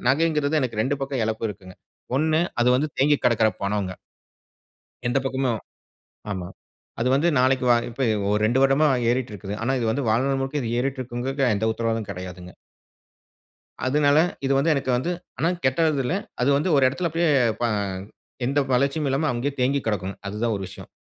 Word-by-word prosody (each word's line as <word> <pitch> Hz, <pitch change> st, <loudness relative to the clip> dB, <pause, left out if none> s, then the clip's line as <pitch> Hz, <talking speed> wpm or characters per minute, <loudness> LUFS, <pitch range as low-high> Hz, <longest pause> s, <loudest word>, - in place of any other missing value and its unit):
நகைங்கிறது 150 Hz, +1 st, +2 dB
எனக்கு 115 Hz, -4 st, -1 dB
2 140 Hz, +3 st, -1 dB
பக்கம் 135 Hz, -3 st, -2 dB
இழப்பு 110 Hz, 0 st, -2 dB
இருக்குங்க. 95 Hz, -2 st, -12 dB, 0.4 s
ஒன்னு 155 Hz, +1 st, +2 dB, 0.2 s
அது 125 Hz, -, +3 dB
வந்து 145 Hz, +4 st, +1 dB
தேங்கி 145 Hz, +2 st, +4 dB
கிடக்குற 115 Hz, -2 st, +4 dB
பணோங்க. 100 Hz, -2 st, -2 dB, 1.1 s
எந்த 120 Hz, -, +2 dB
பக்கமும் 135 Hz, -1 st, 0 dB, 0.8 s
ஆமா. 90 Hz, -3 st, -4 dB, 0.5 s
அது 120 Hz, -, +1 dB
வந்து 150 Hz, +5 st, +2 dB
நாளைக்கு 130 Hz, 0 st, +2 dB
வா 120 Hz, -, +7 dB
இப்ப 120 Hz, +3 st, -6 dB, 0.3 s
ஒரு 105 Hz, +1 st, +1 dB
2 120 Hz, +5 st, +3 dB
வருடமா 135 Hz, +3 st, +4 dB, 0.2 s
ஏறிட்டு 125 Hz, -1 st, 0 dB
இருக்குது. 100 Hz, +1 st, -6 dB
ஆனா, 125 Hz, +3 st, 0 dB
இது 115 Hz, -, -1 dB
வந்து 140 Hz, +5 st, -1 dB
வாழ்நாள் 135 Hz, +4 st, +1 dB
முழுக்க 135 Hz, -4 st, -2 dB
ஏறிட்டு 135 Hz, +1 st, -2 dB
இருக்கும்ங்கிறதுக்கு 130 Hz, +1 st, -1 dB
எந்த 105 Hz, +2 st, -1 dB
உத்தரவாதமும் 115 Hz, -2 st, -2 dB
கிடையாதுங்க. 90 Hz, -1 st, -7 dB, 1.4 s
அதனால 145 Hz, +2 st, +3 dB, 0.3 s
இது 135 Hz, -, +2 dB
வந்து 160 Hz, +3 st, +3 dB
எனக்கு 135 Hz, -2 st, -1 dB
வந்து 150 Hz, +8 st, -1 dB, 0.3 s
ஆனா 165 Hz, -, +2 dB, 0.2 s
கெட்டது 145 Hz, +2 st, +2 dB
இல்ல. 145 Hz, -, 0 dB, 0.3 s
அது 125 Hz, -, +2 dB
வந்து 150 Hz, +6 st, 0 dB
ஒரு 135 Hz, -, +4 dB
இடத்தில 170 Hz, +6 st, -2 dB
அப்பிடியே 165 Hz, +1 st, +1 dB, 0.3 s
ப -, -, -3 dB, 0.8 s
எந்த 140 Hz, +2 st, 0 dB
வளர்ச்சியும் 140 Hz, +3 st, +1 dB
இல்லாம 155 Hz, +4 st, +1 dB
அங்கேயே 125 Hz, +4 st, -2 dB
தேங்கி 140 Hz, +3 st, +2 dB
கிடக்கணும். 100 Hz, -3 st, -2 dB
அது 105 Hz, +2 st, -5 dB
தான் 115 Hz, -, +1 dB
ஒரு 100 Hz, -, -5 dB
விஷயம். -, -, -11 dB
130 Hz, 170 wpm, -24 LUFS, 110-140 Hz, 1.4 s, வா